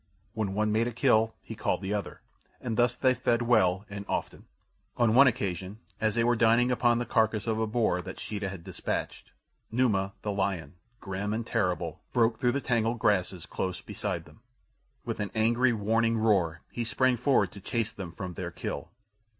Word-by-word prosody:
When 105 -3 -2
one 105 0 +1
made 110 +2 +2
a - - -2
kill 115 -2 +3
he - - -7
called - - -1
the 95 +2 -1
other, 105 -1 -4 0.4
and 115 -3 -3
thus 120 0 +3
they 130 -1 +3
fed 120 -1 +1
well 95 -5 +3
and 100 0 -6
often. - - -3 0.5
On 115 -2 +3
one 135 +3 +8
occasion 95 -4 -2 0.2
as 110 -1 +1
they 115 - +2
were 120 +1 +3
dining 115 +2 +4
upon 120 -1 +3
the 120 - -1
carcass 110 -2 +1
of 110 -1 0
a 110 - +1
boar 110 -4 +1
that 95 +1 -8
Sheeta 105 -2 -3
had 95 -3 -8
dispatched, - - -4 0.4
Numa, 105 -5 +1
the 105 - -1
lion, 95 -7 -2 0.3
grim 100 +2 -3
and 115 0 -3
terrible, 90 -5 -1
broke 115 -1 +2
through 120 -1 +2
the 140 - -1
tangled 115 -2 +1
grasses 95 -5 +1
close 90 -1 -3
beside - - -4
them. 75 - -18 0.7
With - - -3
an 105 -1 -2
angry, 120 +3 +3
warning 115 +1 +1
roar 95 -7 +2
he 120 - -3
sprang 130 +2 +2
forward 125 +3 +2
to 100 - -11
chase 115 +2 -1
them 95 -4 -7
from 90 +1 -6
their - - -4
kill. - - -5
110 Hz, 190 wpm, -29 LUFS, 100-120 Hz, 0.7 s, one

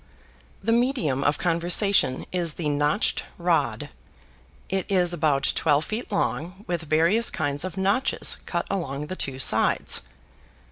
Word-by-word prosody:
The 225 - +1
medium 230 - +1
of 145 +1 +2
conversation 175 -2 +2
is 175 -3 -1
the 155 -4 -2
Notched 145 +7 +1 0.2
Rod. - - 0 0.8
It 190 -1 -3
is 180 -2 +3
about 150 -4 +1
twelve 150 -1 +1
feet 220 +2 -5
long 190 0 -2
with 175 -1 -2
various 170 +9 +3
kinds 145 -2 -1
of 185 +1 -6
notches 200 +7 +1
cut - - -2
along 150 -7 -3
the 185 - -6
two 135 -7 -2
sides. 130 - +3
170 Hz, 135 wpm, -24 LUFS, 150-195 Hz, 0.8 s, is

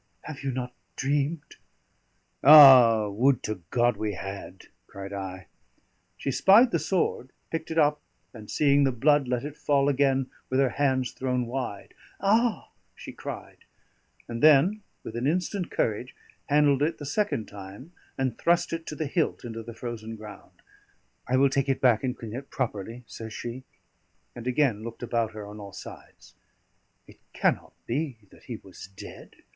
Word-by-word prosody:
Have 150 -3 -8
you 140 - -1
not 125 -1 -4 0.2
dreamed?" 145 +3 -2 0.9
"Ah, 130 -7 +9
would 120 +6 +2
to 110 -4 -4
God 120 0 +2
we 105 -1 -2
had!" 95 0 -8 0.2
cried 100 0 -8
I. 95 -1 -6 0.7
She 135 - -2
spied 215 - +6
the 170 - +1
sword, 160 -5 -1 0.2
picked 165 -1 -4
it 160 - -4
up, 150 -1 +3 0.3
and 110 -3 -11
seeing 140 -1 +3
the 135 - +3
blood, 140 +3 +2
let 125 +1 -1
it 150 0 -6
fall 140 -1 +2
again 135 -1 +2 0.2
with 130 - +1
her 135 -1 +3
hands 130 -4 0
thrown 125 -1 -2
wide. 120 -4 -5 0.3
"Ah!" 220 +3 +1 0.2
she - - -9
cried, - - -8 0.7
and 115 0 -5
then, 155 +8 +5 0.2
with 110 - -8
an 120 +3 -1
instant 180 +3 -1
courage, 115 +4 -2 0.3
handled 145 -1 +4
it 155 +3 0
the 145 - -8
second 145 - -1
time, 100 - -11 0.3
and 130 -3 -2
thrust 170 0 +2
it 165 0 -5
to 150 - -5
the 155 - -3
hilt 155 -2 -1
into 115 -1 -6
the 115 0 -10
frozen 115 -2 -6
ground. 105 -1 -13 0.6
"I 130 - +2
will 140 +1 +5
take 135 0 0
it 135 - +1
back 120 -3 +3
and 130 -1 -2
clean 110 -2 -8
it 135 +3 -7
properly," 115 -1 -4
says 110 -1 -9
she, 120 +2 -6 0.7
and 120 0 -8
again 125 -5 +1
looked 115 +1 -8
about 115 -2 -1
her 105 -1 -7
on 105 +1 -10
all 100 -2 -10
sides. - - -12 0.7
"It - - -18
cannot - - 0
be 135 0 -2
that - - -19
he - - -5
was - - -12
dead?" 95 - -12
130 Hz, 165 wpm, -27 LUFS, 115-145 Hz, 0.9 s, Ah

